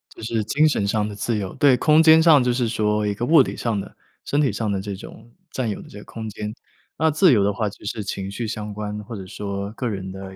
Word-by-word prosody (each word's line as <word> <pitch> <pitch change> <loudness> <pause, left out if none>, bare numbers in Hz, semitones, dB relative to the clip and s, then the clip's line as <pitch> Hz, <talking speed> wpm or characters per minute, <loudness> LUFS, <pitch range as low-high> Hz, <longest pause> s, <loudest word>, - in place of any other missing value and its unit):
就 - - -11
是 110 -1 -1
精 150 +7 +3
神 105 -9 0
上 105 0 0
的 105 - -7
自 110 +2 -1
由， 95 -3 -4
对， 140 -3 +5
空 155 +4 +5
间 160 0 +7
上 150 -6 +6
就 125 0 +1
是 120 -2 0
说 105 -1 0
一 105 - 0
个 115 +4 -3
物 155 +2 +6
理 - - -2
上 115 -4 -1
的、 - - -9 0.3
身 145 - 0
体 140 - +2
上 110 -2 -2
的 95 -1 -1
这 100 -1 -5
种 115 +4 -12 0.2
占 125 -4 -2
有 105 - -4
的 - - -13
这 105 - -10
个 - - -13
空 110 -1 -7
间。 105 +1 -6 0.4
那 160 0 +2
自 160 +2 +5
由 105 -5 +4
的 100 0 +1
话 105 0 -1
就 100 - -15
是 105 0 -3
情 100 0 -5
绪 115 +3 -4
相 105 -1 -5
关， 105 0 -5
或 115 +2 -8
者 95 - -7
说 100 +1 -5
个 125 +1 -3
人 95 -3 -5
的 95 0 -9
110 Hz, 295 characters per minute, -22 LUFS, 100-125 Hz, 0.4 s, 间